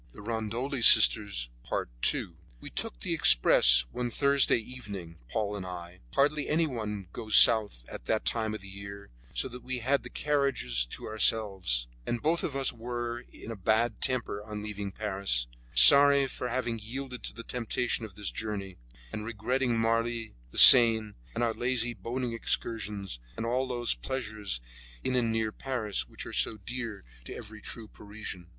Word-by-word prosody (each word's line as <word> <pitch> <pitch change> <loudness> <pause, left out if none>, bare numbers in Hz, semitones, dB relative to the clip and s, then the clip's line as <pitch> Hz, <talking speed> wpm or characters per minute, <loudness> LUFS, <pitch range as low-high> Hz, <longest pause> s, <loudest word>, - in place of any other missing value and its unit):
II 110 +1 -5 2.1
We - - -10
took - - -6
the - - -2
express - - +5
one 125 -1 -4
Thursday 140 +2 +2
evening, 100 -8 -9
Paul 105 - -3
and 100 - -6
I. 90 -1 -9 0.2
Hardly 145 +1 +1
anyone 115 - -2
goes 110 -1 -1
south 105 - +6
at - - -10
that 110 - -1
time 110 -2 -1
of 110 - -9
the 100 - -12
year, 100 -1 -11 0.2
so - - 0
that 125 0 -10
we 130 0 -4
had 135 +4 0
the - - -11
carriages 135 - -1
to - - -8
ourselves, 100 - 0 0.2
and 120 - -2
both 160 +5 0
of 140 - -4
us 135 -1 0
were 120 +1 -6
in 115 - -10
a - - -6
bad 110 +3 -1
temper 120 -5 -1
on 105 -1 -8
leaving 105 -2 -6
Paris, 95 - -2 0.3
sorry 140 - +8
for 125 -1 -6
having 120 -2 -3
yielded 125 +3 -7
to - - -5
the 115 - -8
temptation 120 0 -3
of 105 -5 -9
this 105 0 -5
journey, 100 -4 -6 0.4
and 105 - -5
regretting 120 +3 -2
Marly, 115 0 -1 0.2
the - - -10
Seine, 110 -4 +9 0.2
and - - -1
our 115 -1 0
lazy 120 -1 -1
boating 120 +1 -5
excursions, 105 - -3 0.2
and 115 - -4
all 130 +3 -1
those 120 -2 0
pleasures 110 - -5 0.4
in 130 - -1
and 120 -2 0
near 110 -1 -1
Paris 110 - -3
which - - -9
are - - -9
so 110 - 0
dear 115 0 -7 0.2
to - - -9
every 110 0 -10
true 115 -2 -6
Parisian. 105 -4 -9
110 Hz, 160 wpm, -28 LUFS, 100-125 Hz, 2.1 s, Seine